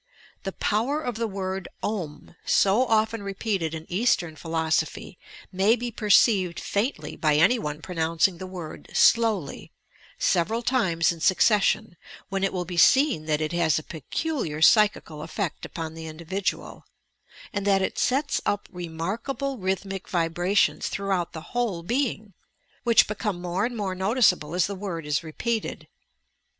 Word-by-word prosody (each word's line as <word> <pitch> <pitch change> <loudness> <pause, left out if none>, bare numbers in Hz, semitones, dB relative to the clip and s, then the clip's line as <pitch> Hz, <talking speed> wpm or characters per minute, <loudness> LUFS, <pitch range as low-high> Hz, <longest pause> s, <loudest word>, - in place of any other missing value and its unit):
The 195 - -4
power 240 +8 0
of 245 -7 -4
the 230 0 -1
word 190 -2 -4 0.2
"ou," 175 -10 -5
so 210 +6 +3
often 220 0 +1
re 195 -1 -5
peated 190 -7 -1
in 160 0 -7
Eastern 180 -5 +1
Philosophy, 160 +2 -2 0.3
may 195 +5 +3
be 240 0 -4
perceived 205 -4 +3
faintly 220 +7 -2
by 155 -2 +2
any 190 +11 +4
one 150 -4 -5
pronouncing 165 +1 0
the 185 - -6
word 180 -4 -8
slowly, 220 -10 +2 0.5
several 220 +7 +1
times 175 - +2
in 170 - -7
succession, 205 0 +3 0.3
when 195 0 -2
it 195 - +1
will 180 -1 -3
be 175 0 -6
seen 265 - +4
that 155 -1 0
it 155 0 -1
has 170 -3 +2
a 155 - -3
peculiar 165 - -3
psychical 205 -4 +4
effect 180 +1 -4
upon 160 -2 -6
the 160 0 -8
individual, 170 +5 -4 0.7
and 200 0 -2
that 195 -1 +3
it - - -2
sets 280 +3 +1
up 205 - -1
remarkable 200 - -4
rhythmic 190 0 -3
vibrations 175 +3 +1
throughout 195 -3 -1
the 160 +1 -9
whole 225 -9 -1
be 250 +7 +1
ing, 210 -2 -11 0.5
which 235 -2 +5
become 210 -3 -3
more 180 +3 -1
and 240 0 -4
more 195 -3 -2
noticeable 190 - +2
as 180 - +3
the 200 - -4
word 185 -5 -5
is 150 +2 0
repeated. 220 +8 -3
190 Hz, 150 wpm, -25 LUFS, 165-220 Hz, 0.7 s, which